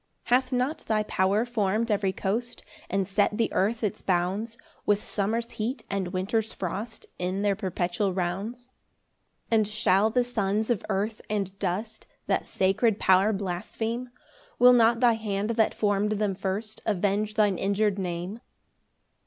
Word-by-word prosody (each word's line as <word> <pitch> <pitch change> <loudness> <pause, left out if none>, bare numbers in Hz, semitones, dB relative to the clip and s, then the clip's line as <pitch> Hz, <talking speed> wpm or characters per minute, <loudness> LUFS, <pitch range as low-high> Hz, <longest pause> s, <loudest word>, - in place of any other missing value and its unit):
14 245 - +4
Hath 255 0 -11
not 255 +4 0
thy 215 -1 +2
power 200 +2 +1
form'd 220 -1 0
every 200 -2 +1
coast, 230 +6 -3 0.3
And 195 0 0
set 205 +1 +1
the 230 - 0
earth 220 +4 +1
its 205 - -1
bounds, 195 +6 -1 0.3
With 205 0 +2
summer's 225 +3 -2
heat 230 +2 -3
and 195 -2 -1
winter's 200 +5 -1
frost, 200 +5 -5
In 185 +3 -1
their 200 -1 +2
perpetual 190 0 -1
rounds? 200 +8 -3 0.8
15 225 - +5
And 215 - +1
shall 210 -1 +3
the 245 +2 +2
sons 220 -2 0
of 225 - 0
earth 210 +2 -1
and 200 -3 -2
dust 205 +4 -3 0.2
That - - 0
sacred 200 +3 +2
power 190 +3 +4
blaspheme? 220 +5 -3 0.5
Will 250 0 +8
not 235 0 +4
thy 240 -2 +6
hand 210 -1 -2
that 225 -1 +2
form'd 205 0 +1
them 210 -1 0
first 200 +3 -4
Avenge 205 +1 0
thine 205 -4 +2
injur'd 200 0 +1
Name? 180 +3 -4
210 Hz, 155 wpm, -27 LUFS, 195-225 Hz, 0.8 s, Will